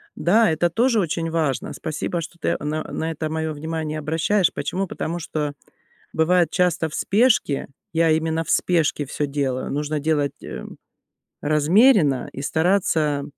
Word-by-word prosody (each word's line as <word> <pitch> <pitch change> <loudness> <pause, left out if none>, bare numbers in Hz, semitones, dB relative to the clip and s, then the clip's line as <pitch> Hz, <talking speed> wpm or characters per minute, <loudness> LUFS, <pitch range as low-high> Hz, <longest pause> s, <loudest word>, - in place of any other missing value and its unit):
Да, 215 +2 +3
это 160 +2 +1
тоже 230 +5 +2
очень 165 -2 -1
важно. 155 -5 -1
Спасибо, 160 +2 -3
что 170 +1 -9
ты - - 0
на 155 +1 -2
на 160 +1 -3
это 155 0 -4
мое 160 0 -2
внимание 155 0 -4
обращаешь. 165 +5 +1
Почему? 190 +1 -2
Потому 170 +1 -4
что 150 -3 -3 0.6
бывает 170 0 +3
часто 175 -3 +1
в 155 - -11
спешке, 205 - +2 0.3
я 165 0 +3
именно 160 +1 0
в - - -6
спешке 160 -4 +1
всё 145 +1 -2
делаю, 140 -2 -2
нужно 150 +1 -2
делать, 145 -1 -1
э, - - -7 0.8
размеренно 155 - +4
и 135 - -6
стараться, 160 -3 +1
160 Hz, 150 wpm, -22 LUFS, 150-175 Hz, 0.8 s, размеренно